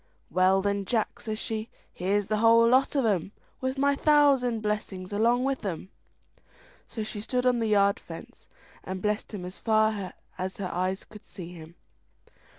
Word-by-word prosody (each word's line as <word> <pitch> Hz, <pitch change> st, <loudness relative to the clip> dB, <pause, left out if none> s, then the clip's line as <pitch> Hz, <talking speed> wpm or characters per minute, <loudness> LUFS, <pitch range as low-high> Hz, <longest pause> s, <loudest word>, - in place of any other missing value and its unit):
"Well, 185 Hz, +2 st, +3 dB
then, 200 Hz, -1 st, 0 dB
Jack," 225 Hz, +1 st, -1 dB
says 220 Hz, -2 st, -4 dB
she, 220 Hz, 0 st, -4 dB, 0.2 s
"here's 200 Hz, +3 st, 0 dB
the 215 Hz, -, 0 dB
whole 230 Hz, +1 st, +6 dB
lot 260 Hz, +4 st, +3 dB
of 270 Hz, -4 st, +2 dB
'em 200 Hz, -2 st, 0 dB, 0.3 s
with 260 Hz, +1 st, -2 dB
my 280 Hz, +1 st, +3 dB
thousand 275 Hz, -6 st, +4 dB
blessings 210 Hz, -3 st, -3 dB
along 235 Hz, +4 st, +3 dB
with 270 Hz, 0 st, -1 dB
them." 190 Hz, -2 st, -4 dB, 1.0 s
So 220 Hz, -, -4 dB
she 215 Hz, -1 st, -4 dB
stood 250 Hz, +3 st, -1 dB
on 250 Hz, -1 st, +3 dB
the 225 Hz, -, 0 dB
yard 200 Hz, +1 st, +3 dB
fence -, -, -11 dB, 0.3 s
and 190 Hz, 0 st, -5 dB
blessed 210 Hz, +2 st, -2 dB
him 195 Hz, -5 st, -6 dB
as 180 Hz, +2 st, -8 dB
far 215 Hz, -4 st, +1 dB, 0.3 s
as 185 Hz, +1 st, -3 dB
her 190 Hz, -3 st, -4 dB
eyes 185 Hz, +2 st, -1 dB
could 215 Hz, 0 st, -14 dB
see 175 Hz, -2 st, -9 dB
him. 165 Hz, 0 st, -12 dB
215 Hz, 170 wpm, -27 LUFS, 190-235 Hz, 1.0 s, whole